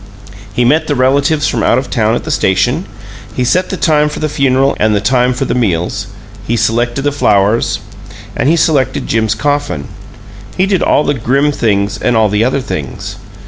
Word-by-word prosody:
He 120 +4 0
met 155 +5 +2
the 145 - 0
relatives 140 +4 +2
from - - -1
out - - +3
of 130 -1 -3
town 110 -1 +1
at - - -3
the - - -4
station; 125 - +1 0.5
he 125 - 0
set 180 +9 +1
the 190 - -3
time 150 -3 +2
for - - -6
the 155 - -1
funeral 135 -1 +1
and 110 0 +2
the - - +2
time 125 +3 +2
for 125 +2 -2
meals; 95 -10 -1 0.4
he 115 - 0
selected 120 +4 0
the 145 - +1
flowers 105 -5 +1 0.6
and 130 - +1
he 165 - +4
selected 150 -6 +1
Jim's 110 -1 0
coffin; 145 - -2 0.7
he 185 - +3
did 195 -2 0
all 150 - +2
the 145 - 0
grim 135 +4 +1
things 105 -4 0
and 120 - +1
all 110 -1 +3
the 105 +2 +1
other 130 +3 0
things. 75 - -6
125 Hz, 190 wpm, -13 LUFS, 110-145 Hz, 0.7 s, he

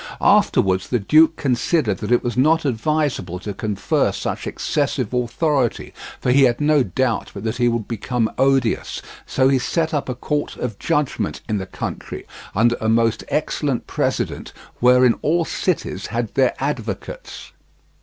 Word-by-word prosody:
Afterwards 95 0 +3
the 125 - +2
duke 155 +9 +4
considered 125 - 0
that 105 - -4
it 120 - +3
was 120 - -2
not 155 +5 +3
advisable 130 - -1
to 100 +3 -6
confer 105 0 0
such - - -4
excessive - - -1
authority, 125 +1 0 0.3
for 125 - +1
he 135 +1 +6
had 120 -2 +1
no 150 -1 +3
doubt 130 -2 -1
but 100 - -6
that 110 +1 -2
he 120 -1 +2
would 115 -2 -1
become 115 +1 -1
odious, 135 -3 +1 0.2
so 130 0 +2
he 135 -1 +3
set 160 +5 -1
up 145 -3 -1
a 125 - -2
court 145 +3 -2
of 115 -5 -4
judgment 150 -4 -1
in 105 -3 -1
the 95 - -6
country, - - -6 0.3
under 115 +3 +3
a 110 - +1
most 115 0 +2
excellent - - -1
president, - - -2 0.3
wherein 125 0 +5
all 165 +2 +1
cities - - -2
had - - -3
their - - +2
advocates. - - -5
125 Hz, 155 wpm, -21 LUFS, 115-145 Hz, 0.3 s, he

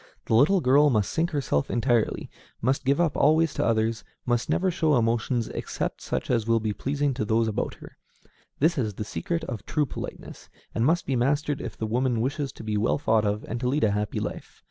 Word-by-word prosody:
The - - -1
little 155 - +5
girl 145 +3 +5
must 105 -6 +1
sink 165 +1 0
herself 135 - -1
entirely, 120 -2 0 0.3
must 130 +3 0
give 140 +3 +2
up 170 -4 +2
always 160 +2 +3
to - - -1
others, 110 -1 +1 0.2
must 120 -1 0
never 185 0 +2
show 160 -4 +2
emotions 115 +1 0
except - - -4
such - - -3
as 115 -2 +1
will 115 0 +3
be 110 -1 -2
pleasing 140 +4 -1
to 125 - -2
those 110 +1 +1
about 110 - -2
her: - - -14 0.6
this 160 +1 +2
is 110 -5 -1
the 105 - -4
secret 165 +9 -3
of 110 -9 -5
true 150 -2 0
politeness, - - -8 0.2
and 115 +3 +1
must 170 +2 +2
be 135 - 0
mastered 145 +4 0
if - - -6
the 110 - -2
woman 120 +1 0
wishes 135 +3 -1
to - - -10
be 105 -1 -1
well 110 +4 +1
thought 110 -6 +2
of 105 +1 -1
and 115 - -3
to 125 - -1
lead 145 +3 +1
a 105 - +4
happy 105 +1 -1
life. - - -6
125 Hz, 215 wpm, -26 LUFS, 110-145 Hz, 0.6 s, little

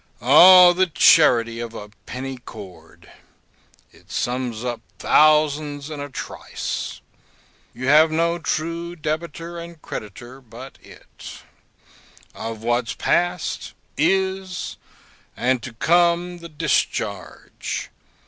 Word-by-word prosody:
O, 175 +8 +8
the 185 +1 +2
charity 120 -8 +4
of 115 -1 -6
a 105 -1 -8 0.2
penny 130 +1 -6
cord! 95 -9 -13 0.8
It - - -23
sums 125 -1 -3
up 120 -2 -4 0.2
thousands 150 -1 +2
in 150 - -6
a 145 0 -6
trice. 130 - -6 0.7
You 125 +2 -6
have 155 +4 +6
no 170 +2 0
true 170 +2 -3
debitor 165 +2 -5
and 170 -1 -10
creditor 120 +3 -9
but 125 +2 -12
it; - - -13 0.9
of 115 -1 -7
what's 120 +1 -1
past, 175 +1 -1 0.2
is, 190 -1 -1 0.6
and 125 0 0
to 130 - -8
come, 175 +6 +1
the 170 0 -10
discharge. 140 - -3
150 Hz, 105 wpm, -22 LUFS, 120-170 Hz, 0.9 s, O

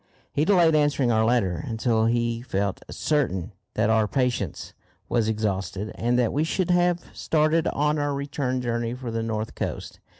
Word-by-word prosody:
He 150 - +2
delayed 175 -4 +5
answering 145 -4 +2
our 110 -1 +3
letter 100 -8 +1
until 115 -1 +1
he 115 0 0
felt 100 -5 -2
certain 115 - -1 0.2
that 110 - +2
our 110 -1 +3
patience 120 - -2 0.3
was 115 -2 +1
exhausted, 105 -1 -2
and 120 +1 0
that 120 -3 +2
we 150 - +1
should 180 +2 0
have 175 0 +1
started 155 +1 +2
on 150 +1 +1
our 145 -1 0
return 140 -2 -2
journey 120 -1 -2
for 125 -2 -6
the 115 0 -2
north 110 -1 -3
coast. - - -5
120 Hz, 165 wpm, -25 LUFS, 110-145 Hz, 0.3 s, delayed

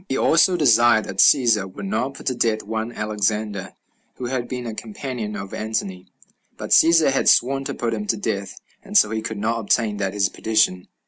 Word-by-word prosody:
He 135 - -1
also 175 +3 +3
desired 120 -6 +4
that - - -8
Cæsar 115 -8 +4
would 145 - -8
not 140 -9 -2
put - - -12
to 130 - 0
death 115 -3 -1
one 110 +2 -4
Alexander, 105 -2 -3 0.4
who 125 - -7
had 120 -1 -3
been 125 -1 -5
a 115 - -5
companion 125 - -6
of 100 -1 -7
Antony; 105 -4 -4 0.5
but - - -7
Cæsar 165 -3 +5
had 135 - +2
sworn 135 +2 +2
to - - -4
put 115 -1 -2
him 105 -2 -4
to 110 - 0
death, 100 -1 -4 0.2
and - - -1
so 105 - +4
he 110 0 -2
could 110 0 -5
not 115 +3 -1
obtain 110 -1 0
that 95 -2 -2
his 100 -1 +2
petition. 110 -5 0
110 Hz, 200 wpm, -21 LUFS, 105-125 Hz, 0.5 s, Cæsar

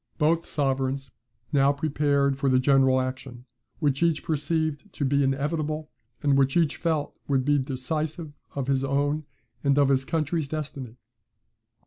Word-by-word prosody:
Both 165 +1 +2
sovereigns 135 -1 -1 0.4
now 140 0 +5
prepared 140 -1 +1
for 135 0 0
the 130 - +4
general 130 0 +4
action, 130 -1 -5 0.3
which 145 -2 0
each 170 -2 +2
perceived 155 +3 -1
to 145 - -2
be 140 +1 +2
inevitable, 150 +3 -1 0.3
and 140 -1 +3
which 135 +2 +3
each 160 -4 +2
felt 160 -3 -1
would 135 -2 +1
be 145 0 +3
decisive 150 +4 -3 0.2
of 140 -2 -2
his 135 0 +1
own 145 +2 0 0.4
and 140 -1 +3
of 140 -1 +4
his 135 -1 +2
country's 160 0 -1
destiny. 140 -5 -5
140 Hz, 145 wpm, -26 LUFS, 135-155 Hz, 0.4 s, now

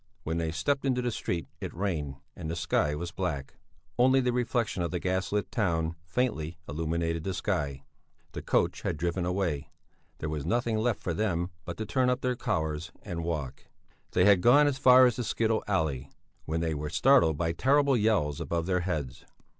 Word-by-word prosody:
When 80 +1 -2
they 80 -1 -1
stepped 135 - 0
into 125 -2 +1
the 120 - 0
street 85 -6 -3
it - - -5
rained 80 -7 -2 0.2
and 80 -3 -6
the 85 - -2
sky 75 -3 +1
was 85 +3 -5
black; 70 -2 -3 0.5
only 130 +2 +5
the 125 -1 +1
reflexion 120 -5 0
of 85 - -1
the 90 - -2
gas 95 +1 -1
lit 105 0 -1
town 85 -6 0
faintly 85 -6 -1
illuminated 80 +2 -2
the 95 0 -2
sky. 70 -5 -2 0.5
The - - -6
coach - - +1
had - - -2
driven 85 +2 -1
away; 90 -6 -1 0.5
there 80 - -4
was 75 -2 -3
nothing 115 - 0
left 115 -1 0
for 85 - -2
them 90 -2 -1
but 85 - -6
to 110 - -3
turn 125 +3 +1
up 125 +1 0
their 125 -1 0
collars 80 -6 -2
and 85 -4 -4
walk. 75 -6 -4 0.5
They 90 - +4
had 100 -3 +6
gone 135 +7 +6
as 140 -2 0
far 130 -1 +8
as 120 -1 +2
the 125 - -1
skittle 110 0 0
alley, 75 -9 -1 0.4
when 80 +1 -1
they 80 -1 0
were 75 0 -4
startled 85 - +4
by 80 +1 0
terrible 140 - +3
yells 105 - +1
above 85 -1 -2
their 90 0 +1
heads. 75 -8 -3
90 Hz, 195 wpm, -29 LUFS, 80-115 Hz, 0.5 s, far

